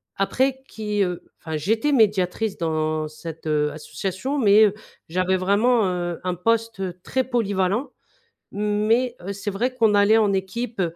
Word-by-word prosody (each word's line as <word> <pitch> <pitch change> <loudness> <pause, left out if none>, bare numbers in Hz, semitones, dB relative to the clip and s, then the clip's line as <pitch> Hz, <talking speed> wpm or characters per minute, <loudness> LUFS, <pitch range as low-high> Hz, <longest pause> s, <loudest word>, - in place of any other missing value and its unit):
après 260 +7 0
qui, 210 -2 -1
heu, 180 -2 -3 0.2
enfin 160 -1 -4
j'étais 220 - 0
médiatrice 210 -3 +2
dans 155 -1 -1
cette, 160 +1 -9
heu, 150 -1 +1
association 195 - -4
mais 215 -3 +6
heu, 205 - +1 0.4
j'avais 185 +2 +1
vraiment, 205 +4 +2
heu, 175 -1 -3
un 180 -1 -1
poste 195 -3 -1
très 260 +6 -1
polyvalent 210 -1 0 0.6
mais 215 +4 +1
heu, 200 - -2
c'est 200 +1 -4
vrai 245 +6 -1
qu'on 225 -4 +3
allait 205 +2 +5
en 210 -2 +3
équipe, 205 +3 -3
200 Hz, 150 wpm, -23 LUFS, 180-225 Hz, 0.6 s, mais